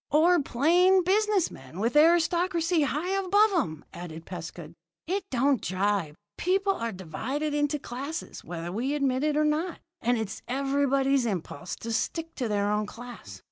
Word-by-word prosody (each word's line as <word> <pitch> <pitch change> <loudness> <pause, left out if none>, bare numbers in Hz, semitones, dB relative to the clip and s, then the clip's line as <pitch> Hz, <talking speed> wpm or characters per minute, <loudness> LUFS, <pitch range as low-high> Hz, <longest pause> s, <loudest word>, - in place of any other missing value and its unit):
"Or 335 +3 +4
plain 355 +9 +4
business 405 0 +2
men 135 +6 -11
with 230 +6 0
aristocracy 340 +1 +3
high 300 +5 -1
above 390 +2 +3
'em," 195 - -1
added 165 -2 -8
Pescud. 170 -2 -8 0.3
"It 380 +3 -2
don't 265 -1 +2
jibe. 190 -4 0 0.2
People 390 +2 +2
are 230 -9 -3
divided 235 - -3
into 295 0 +1
classes, 280 +4 -6
whether 170 0 -5
we 250 +9 -1
admit 270 -2 +1
it 300 -1 +1
or 305 - +3
not, 315 +4 -1 0.2
and 245 +1 +2
it's 220 -3 -4
everybody's 275 0 +1
impulse 180 -5 -4
to 230 0 -3
stick 325 +8 -2
to 250 - -1
their 205 -1 0
own 210 0 0
class. 230 - -10
275 Hz, 155 wpm, -27 LUFS, 205-330 Hz, 0.3 s, Or